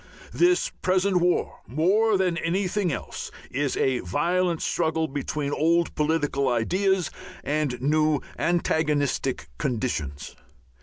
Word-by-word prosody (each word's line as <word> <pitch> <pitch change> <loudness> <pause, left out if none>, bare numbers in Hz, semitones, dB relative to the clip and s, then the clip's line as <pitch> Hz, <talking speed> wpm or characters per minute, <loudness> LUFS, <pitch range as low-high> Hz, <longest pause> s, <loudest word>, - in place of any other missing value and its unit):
This 355 +1 +3
present 185 +1 +2
war, 175 0 +1
more 195 - +3
than 185 -2 +1
anything 185 +1 0
else, - - -5 0.2
is 140 +1 -1
a 130 -2 +1
violent 175 - 0
struggle 160 -1 0
between 145 +1 -3
old 170 +3 +2
political 150 -3 +1
ideas 185 - +1 0.3
and 145 -4 -1
new 155 +2 +2 0.2
antagonistic 150 -6 0
conditions. 110 - -3
160 Hz, 105 wpm, -25 LUFS, 140-180 Hz, 0.3 s, This